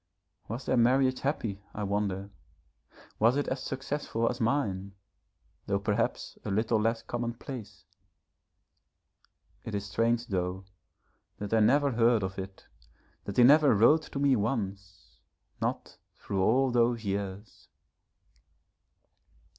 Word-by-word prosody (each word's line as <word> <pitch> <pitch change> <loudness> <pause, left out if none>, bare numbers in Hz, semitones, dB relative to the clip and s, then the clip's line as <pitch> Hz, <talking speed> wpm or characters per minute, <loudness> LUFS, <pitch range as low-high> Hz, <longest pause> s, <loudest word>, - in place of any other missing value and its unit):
Was 115 +5 -5
their - - +1
marriage 130 +2 +3
happy 115 -8 -2
I 105 - -3
wonder? 100 -1 -2 0.9
Was 115 +5 +4
it 145 - -1
as 130 0 -3
successful 135 -3 -2
as 120 +1 -2
mine, 100 -6 -1 0.7
though 100 - +1
perhaps 100 +1 -2
a - - -4
little 110 +2 +1
less 115 +1 0
commonplace? 120 0 -6 1.8
It 110 - -5
is 100 0 -3
strange, 115 +3 0
though, 95 0 -2 0.7
that 105 +1 -5
I 110 - +4
never 140 +6 +4
heard 115 -2 +3
of 95 +1 -4
it, 95 0 -8 0.6
that 100 - -6
he 125 - +7
never 145 0 +6
wrote 120 +10 +5
to - - -3
me 140 -1 +3
once, 100 -4 -4 0.4
not - - -3 0.2
through 95 -1 -3
all 130 +6 +3
those 120 -1 +1
years. 100 0 -5
115 Hz, 125 wpm, -29 LUFS, 100-125 Hz, 1.8 s, he